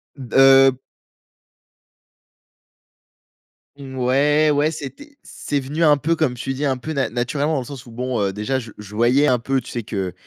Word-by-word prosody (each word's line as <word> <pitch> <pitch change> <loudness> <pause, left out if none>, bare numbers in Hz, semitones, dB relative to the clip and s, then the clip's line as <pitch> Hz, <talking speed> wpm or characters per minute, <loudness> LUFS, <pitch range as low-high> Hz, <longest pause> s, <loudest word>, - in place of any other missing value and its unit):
B 130 -5 -9
heu 135 -1 +6 3.0
Mouais, 140 +3 +1
ouais, 145 +2 +2
c'était 280 - -9
c'est 145 -1 -4
venu 145 +5 -5
un 150 -1 +6
peu, 160 +3 -1
comme 150 -6 +1
tu 135 +2 -4
dis, 145 +3 -3
un 135 - +1
peu 140 +5 -7
na 140 -3 -1
naturellement 140 +6 -2
dans 140 - 0
le 125 - -8
sens 135 -2 -10
où 120 - -13
bon, 125 0 -3
heu, 95 -1 -1
déjà 130 +6 -2
je 115 -3 -10
je 105 0 -11
voyais 125 +6 +3
un 125 - +2
peu, 135 +3 -1
tu 125 - -12
sais 120 -2 -4
que, 95 -4 -4
135 Hz, 180 wpm, -20 LUFS, 125-145 Hz, 3.0 s, heu